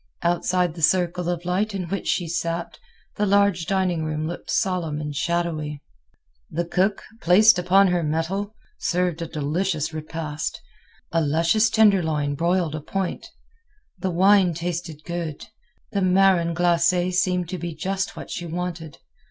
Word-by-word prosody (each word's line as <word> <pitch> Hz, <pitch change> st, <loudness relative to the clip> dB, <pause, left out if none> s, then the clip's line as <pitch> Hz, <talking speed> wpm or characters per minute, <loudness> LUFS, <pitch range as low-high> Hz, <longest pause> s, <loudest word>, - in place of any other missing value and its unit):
Outside 175 Hz, 0 st, +1 dB
the 165 Hz, -, -9 dB
circle 175 Hz, +1 st, +2 dB
of 175 Hz, -1 st, -3 dB
light 200 Hz, +4 st, 0 dB
in 190 Hz, -, -2 dB
which 195 Hz, -, -3 dB
she 175 Hz, -, 0 dB
sat, 170 Hz, +1 st, -3 dB, 0.4 s
the 210 Hz, -, +1 dB
large 200 Hz, -4 st, +3 dB
dining 185 Hz, -4 st, 0 dB
room 155 Hz, 0 st, -2 dB
looked 170 Hz, +2 st, -6 dB
solemn 175 Hz, -6 st, 0 dB
and 150 Hz, -1 st, -5 dB
shadowy. 155 Hz, -3 st, -2 dB, 0.7 s
The 170 Hz, +2 st, -2 dB
cook, 190 Hz, +4 st, 0 dB, 0.2 s
placed 195 Hz, +3 st, +6 dB
upon 190 Hz, +2 st, +4 dB
her 175 Hz, -1 st, +1 dB
mettle, 170 Hz, +7 st, -2 dB, 0.2 s
served 175 Hz, -2 st, 0 dB
a 165 Hz, -, -3 dB
delicious 155 Hz, +1 st, -2 dB
repast—a 155 Hz, +1 st, -5 dB
luscious 165 Hz, +9 st, +2 dB
tenderloin 170 Hz, -10 st, +3 dB
broiled 170 Hz, +1 st, 0 dB
à 155 Hz, -1 st, -5 dB
point. 190 Hz, +2 st, -3 dB, 0.7 s
The 185 Hz, -, -1 dB
wine 185 Hz, 0 st, +4 dB
tasted 165 Hz, -2 st, -4 dB
good; 170 Hz, -3 st, -4 dB, 0.5 s
the 200 Hz, -, -1 dB
marron 185 Hz, -2 st, +3 dB
glacé 175 Hz, +1 st, +2 dB
seemed 180 Hz, -1 st, +1 dB
to 185 Hz, -, -4 dB
be 170 Hz, -2 st, -5 dB
just 190 Hz, +4 st, -2 dB
what -, -, -8 dB
she 175 Hz, -, -4 dB
wanted. 170 Hz, -2 st, -5 dB
175 Hz, 145 wpm, -23 LUFS, 160-185 Hz, 0.7 s, placed